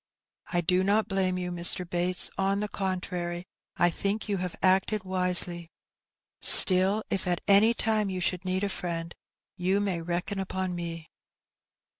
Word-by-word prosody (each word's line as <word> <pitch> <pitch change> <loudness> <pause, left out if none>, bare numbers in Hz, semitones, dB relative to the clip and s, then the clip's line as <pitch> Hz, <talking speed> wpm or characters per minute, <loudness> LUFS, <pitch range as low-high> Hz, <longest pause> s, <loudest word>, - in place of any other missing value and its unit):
'^I 175 -2 -2
do 180 +2 +1
not 210 +3 0
blame 190 -2 -2
you, 180 -1 -5
Mr. 175 +1 +4
Bates; 180 +1 0
on 195 +1 -1
the 210 - -3
contrary, 180 -3 -5 0.3
I 175 0 +2
think 200 +6 -4
you 205 -2 -2
have 180 -1 -6
acted 190 +2 +1
wisely. 180 -2 +2 0.7
Still, 190 +3 +7
if 195 -1 -2
at 175 -1 -1
any 210 +4 +4
time 215 -2 -1
yon 185 -1 -5
should 180 0 -2
need 185 +1 -3
a - - 0
finend, 170 -2 -6 0.4
you 185 +2 -1
may 190 -4 -3
reckon 175 +4 -4
upon 190 -1 -4
me.'' 170 -2 -7
185 Hz, 155 wpm, -26 LUFS, 175-195 Hz, 0.7 s, Still